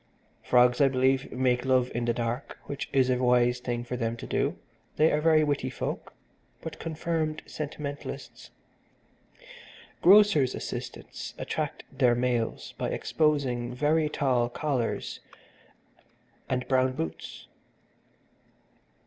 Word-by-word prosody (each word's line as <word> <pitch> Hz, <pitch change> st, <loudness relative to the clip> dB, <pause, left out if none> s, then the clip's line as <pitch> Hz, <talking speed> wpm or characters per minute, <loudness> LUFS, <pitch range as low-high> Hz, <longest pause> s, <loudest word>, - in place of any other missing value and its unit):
Frogs, 125 Hz, +1 st, +4 dB
I 140 Hz, -, +7 dB
believe, 130 Hz, 0 st, +1 dB
make 125 Hz, -1 st, +1 dB
love 130 Hz, -1 st, +2 dB
in 120 Hz, 0 st, -1 dB
the 120 Hz, -, +1 dB
dark, 120 Hz, +2 st, -3 dB
which 140 Hz, -, -5 dB
is 130 Hz, -2 st, +3 dB
a 125 Hz, 0 st, +1 dB
wise 125 Hz, 0 st, +3 dB
thing 120 Hz, -1 st, -3 dB
for 125 Hz, +1 st, -4 dB
them 115 Hz, -1 st, -2 dB
to -, -, -7 dB
do -, -, -1 dB, 0.4 s
they 155 Hz, +1 st, +4 dB
are 150 Hz, -, +1 dB
very 155 Hz, -1 st, +5 dB
witty 145 Hz, -2 st, 0 dB
folk, -, -, -5 dB, 0.5 s
but 160 Hz, -2 st, -7 dB
confirmed 160 Hz, -1 st, -2 dB
sentimentalists. 145 Hz, -1 st, -6 dB, 1.5 s
Grocers' 190 Hz, -9 st, +6 dB
assistants -, -, -6 dB
attract -, -, -3 dB
their 125 Hz, -3 st, +4 dB
mates 120 Hz, -2 st, -1 dB
by -, -, -3 dB
exposing 130 Hz, -6 st, 0 dB
very 150 Hz, +3 st, +2 dB
tall 125 Hz, -5 st, +1 dB
collars 130 Hz, -2 st, -2 dB, 1.3 s
and 125 Hz, -1 st, -1 dB
brown 130 Hz, -1 st, +2 dB
boots. 80 Hz, -10 st, -6 dB
130 Hz, 120 wpm, -28 LUFS, 125-150 Hz, 1.5 s, I